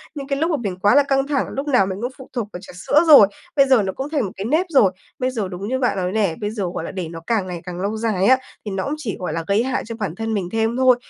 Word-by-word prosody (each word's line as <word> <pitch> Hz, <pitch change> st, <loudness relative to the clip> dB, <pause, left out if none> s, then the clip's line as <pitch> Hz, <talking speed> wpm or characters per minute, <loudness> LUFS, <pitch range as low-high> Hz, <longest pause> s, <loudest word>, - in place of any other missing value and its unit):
Nhưng 280 Hz, -2 st, -6 dB
cái 275 Hz, 0 st, -1 dB
lúc 325 Hz, +3 st, +1 dB
mà 305 Hz, -, +1 dB
mình 190 Hz, -5 st, -4 dB
quá 205 Hz, +7 st, +4 dB
là 285 Hz, -, +6 dB
căng 270 Hz, 0 st, +1 dB
thẳng, 285 Hz, -2 st, 0 dB
lúc 280 Hz, +2 st, -4 dB
nào 250 Hz, -9 st, +4 dB
mình 190 Hz, +1 st, -5 dB
cũng 245 Hz, +2 st, -2 dB
phụ 260 Hz, -, -12 dB
thuộc 235 Hz, -5 st, -2 dB
vào 180 Hz, -, -6 dB
trà 190 Hz, -, -12 dB
sữa 285 Hz, -, +2 dB
rồi, 280 Hz, -10 st, +9 dB, 0.3 s
bây 275 Hz, -, +6 dB
giờ 255 Hz, -6 st, +4 dB
nó 190 Hz, -, -3 dB
cũng 270 Hz, +2 st, -5 dB
thành 290 Hz, -7 st, 0 dB
một 190 Hz, -, -5 dB
cái 195 Hz, -, -4 dB
nếp 315 Hz, +9 st, +2 dB
rồi. 240 Hz, -, +4 dB, 0.3 s
Bây 255 Hz, 0 st, 0 dB
giờ 215 Hz, -6 st, -2 dB
đúng 190 Hz, +3 st, -5 dB
như 260 Hz, +2 st, -1 dB
bạn 245 Hz, -6 st, +1 dB
nói 180 Hz, 0 st, -1 dB
nè, 200 Hz, -6 st, +1 dB
bây 205 Hz, -, -1 dB
giờ, 215 Hz, -2 st, -3 dB
gọi -, -, -4 dB
là, -, -, -5 dB
để 180 Hz, -4 st, -4 dB
nó 165 Hz, 0 st, -8 dB
càng 215 Hz, -5 st, 0 dB
ngày 175 Hz, -2 st, -6 dB
càng 180 Hz, 0 st, -6 dB
lâu 210 Hz, +2 st, -2 dB
dài 215 Hz, -4 st, 0 dB
á, 260 Hz, +4 st, +6 dB, 0.3 s
thì 205 Hz, -, -4 dB
nó 190 Hz, 0 st, -2 dB
cũng 285 Hz, -, -2 dB
chỉ, 245 Hz, -10 st, -4 dB
gọi 180 Hz, -, -3 dB
là, 165 Hz, 0 st, -2 dB
gây 200 Hz, +3 st, +2 dB
hại 260 Hz, +1 st, -1 dB
cho 230 Hz, 0 st, -6 dB
bản 190 Hz, -6 st, -3 dB
thân 225 Hz, +2 st, -3 dB
mình 185 Hz, -4 st, -2 dB
thêm 225 Hz, +1 st, 0 dB
thôi. 255 Hz, -1 st, +5 dB
220 Hz, 330 wpm, -21 LUFS, 190-265 Hz, 0.3 s, rồi